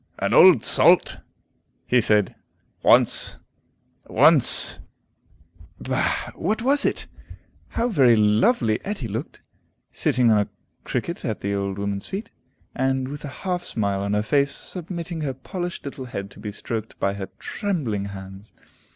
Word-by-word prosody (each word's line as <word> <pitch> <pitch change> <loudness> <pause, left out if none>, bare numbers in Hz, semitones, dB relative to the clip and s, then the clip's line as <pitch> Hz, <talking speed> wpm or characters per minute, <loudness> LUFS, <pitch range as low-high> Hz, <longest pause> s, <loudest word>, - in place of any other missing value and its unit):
"An - - -1
old - - +7
salt," - - +4 0.7
he 125 -1 +3
said, 105 -3 +2 0.5
"once - - +3 0.7
once - - +5 0.6
" 85 +1 -26
Bah, - - -2
what 215 +7 -2
was 280 +3 +3
it? - - -1 0.6
How 235 - -1
very 135 - +4
lovely 110 - +2
Etty 195 - -4
looked, 115 +8 -6 0.5
sitting 120 -2 +2
on 105 - +4
a 105 - -1 0.4
cricket - - -4
at - - -3
the 100 +1 -2
old 100 -1 -3
woman's 100 -1 -4
feet, 205 +3 -6 0.4
and, 130 0 -1
with 145 +1 -8
a - - -5 0.2
half 180 -1 -1
smile 100 -3 -2
on 100 +1 -1
her 105 - 0
face, 140 +5 +2
submitting 170 0 -5
her 135 -4 -3
polished 175 +6 -6
little 135 -2 -7
head 100 -5 -7
to - - -15
be 105 - -6
stroked 110 +1 -6
by 100 - 0
her 100 -1 -6
trembling 135 - -3
hands! 95 +1 -10
115 Hz, 145 wpm, -23 LUFS, 100-165 Hz, 0.7 s, old